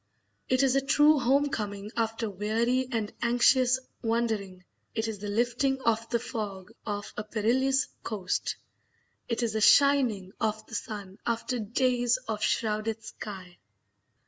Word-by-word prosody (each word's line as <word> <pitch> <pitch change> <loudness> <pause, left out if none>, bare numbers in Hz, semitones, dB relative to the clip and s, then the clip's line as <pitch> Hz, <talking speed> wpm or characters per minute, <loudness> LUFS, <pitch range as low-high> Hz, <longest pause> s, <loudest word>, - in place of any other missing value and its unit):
It 255 +1 +3
is 270 -1 +3
a 275 - +4
true 295 +2 +5
home 275 +3 +3
coming 205 -4 -4
after 225 0 -1
weary 225 +6 0
and 220 -3 -2
anxious 245 +2 +4 0.2
wandering; 220 -5 -1 0.3
it 220 0 0
is 215 -3 -4
the 205 - -5
lifting 245 +5 +1
of 230 -1 0
the 235 - +2
fog 210 -6 -5 0.2
off 205 -1 -4
a 210 - -2
perilous 250 +6 +1
coast; 190 -5 -2 0.7
it 235 +1 0
is 225 -2 0
the 220 - -1
shining 250 -8 +4
of 215 -1 -1
the - - -15
sun 205 -3 -6
after 235 +1 -1
days 245 +2 +1
of 215 -2 -3
shrouded 220 0 0
sky. 185 -5 -9
225 Hz, 145 wpm, -28 LUFS, 210-250 Hz, 0.7 s, true